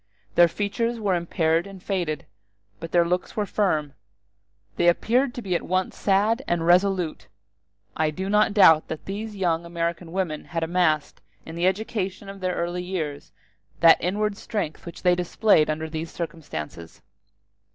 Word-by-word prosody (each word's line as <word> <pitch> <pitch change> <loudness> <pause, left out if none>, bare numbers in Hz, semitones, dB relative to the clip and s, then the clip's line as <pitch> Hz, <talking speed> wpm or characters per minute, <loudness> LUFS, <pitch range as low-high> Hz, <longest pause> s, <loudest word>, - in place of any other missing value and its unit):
Their 175 - +6
features 230 +6 -2
were 205 -3 +1
impaired 170 0 +1
and 195 -1 -10
faded, 175 -7 -2 0.5
but 165 - -7
their 170 -1 +4
looks 180 +1 -2
were 210 - +1
firm: 155 -9 0 0.8
they 175 - +2
appeared 240 +9 +2
to 245 - -6
be 190 -2 -2
at 175 - +1
once 185 +1 -1
sad 210 +5 +2
and 170 -1 0
resolute. 180 -1 +2 0.7
I 155 -1 +1
do 185 +5 -4
not 210 +1 +3
doubt 160 -6 +6
that 160 - -6
these 210 +2 -5
young 170 -4 0
American 170 0 -3
women 175 -4 -2
had 165 -1 -3
amassed, 160 -3 0 0.2
in 160 - -8
the 170 +2 +1
education 195 -1 -2
of 195 0 -9
their 185 -1 -1
early 175 +1 -2
years, 165 -6 -4 0.5
that 165 -1 +7
inward 205 +3 0
strength 195 -10 -4
which 170 - -9
they 180 -1 +5
displayed 175 -1 +3
under 155 +1 -2
these 160 +1 -5
circumstances. 145 - -7
175 Hz, 160 wpm, -24 LUFS, 165-195 Hz, 0.8 s, that